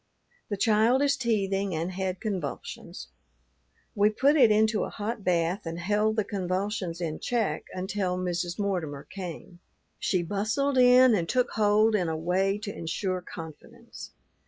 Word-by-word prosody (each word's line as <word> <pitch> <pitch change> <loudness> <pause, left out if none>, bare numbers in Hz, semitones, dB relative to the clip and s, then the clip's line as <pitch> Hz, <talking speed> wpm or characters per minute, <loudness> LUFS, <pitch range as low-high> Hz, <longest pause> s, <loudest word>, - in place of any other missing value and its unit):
The 205 - -2
child 225 +5 +3
is 280 -1 +3
teething 200 -7 0
and 165 +3 -2
had 185 0 -3
convulsions. 185 -10 -5 0.8
We 205 +1 +3
put 270 +7 +3
it 255 -7 +6
into 215 0 +3
a - - -4
hot 215 0 -5
bath 175 +1 0
and 165 +1 -4
held 210 +5 +1
the 215 - +1
convulsions 185 -2 -3
in 160 -2 -3
check 235 -4 -1
until 185 0 -2
Mrs. 175 -1 -2
Mortimer 175 -9 -2
came. 180 -1 -8 0.4
She 185 -2 0
bustled 220 - 0
in 250 0 +7
and 170 -5 0
took 250 -1 +1
hold 215 +1 +3
in 180 -5 +1
a 160 - -2
way 190 +4 +1
to 205 -2 -5
insure 185 +3 -3
confidence. 160 -3 -10
195 Hz, 150 wpm, -27 LUFS, 180-220 Hz, 0.8 s, in